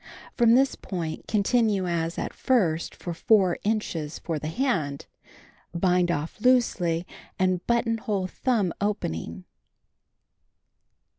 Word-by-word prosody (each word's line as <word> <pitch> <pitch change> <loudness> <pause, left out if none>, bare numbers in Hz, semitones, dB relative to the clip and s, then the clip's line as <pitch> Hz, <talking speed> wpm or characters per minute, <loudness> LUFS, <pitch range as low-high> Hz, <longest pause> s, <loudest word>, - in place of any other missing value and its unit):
From 235 -1 +5
this 270 +1 +3
point 165 -5 -5
continue 210 -2 +2
as 170 -1 -2
at - - -3
first 175 -11 +1
for 175 - -5
4 190 0 +3
niches 175 -8 -2
for 160 -3 -3
the 155 - -5
hand. 160 - -1 0.7
Bind 180 0 +2
off 165 +4 -3
loosely 185 -9 +2 0.3
and 185 -1 +1
buttonhole 230 -4 0
thumb 205 -2 0
opening. 85 - -3
185 Hz, 105 wpm, -26 LUFS, 165-225 Hz, 0.7 s, From